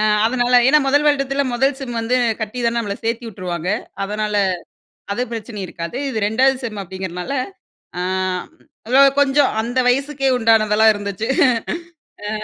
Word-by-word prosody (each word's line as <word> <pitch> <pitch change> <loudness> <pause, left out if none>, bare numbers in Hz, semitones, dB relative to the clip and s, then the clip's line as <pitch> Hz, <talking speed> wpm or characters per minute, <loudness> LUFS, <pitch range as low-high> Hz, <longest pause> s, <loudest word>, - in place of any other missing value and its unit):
அ - - +1 0.2
அதனால 245 +1 +1
ஏன்னா, 300 +2 +6
1 290 +2 +3
வருடத்தில 275 -1 +1
1 270 +4 +1
செம் 245 -4 -5
வந்து 240 +3 0 0.2
கட்டி 220 +3 -4
தான 235 0 +1
நம்ம 205 -3 -3
சேர்த்து 230 +1 -2
வுட்டுருவாங்க. 180 -4 -5 0.3
அதனால 210 +1 -2 0.8
அது 245 - -1
பிரச்சனை 225 -2 -6
இருக்காது. 170 +6 -6
இது 230 -5 -3
2வது 255 +6 +2
செம் 215 -3 -4
அப்படிங்கிறனால, 185 +3 -6 0.7
அ - - -1 0.5
ம் - - -28 0.3
லோ 275 - +8 0.2
கொஞ்சம். 280 0 +3
அந்த 245 +3 -2
வயசுக்கே 275 +1 0
உண்டானதெல்லாம் 220 -1 +4
இருந்துச்சு. 205 +2 -4 1.0
அ. - - -2
230 Hz, 145 wpm, -19 LUFS, 210-265 Hz, 1.0 s, லோ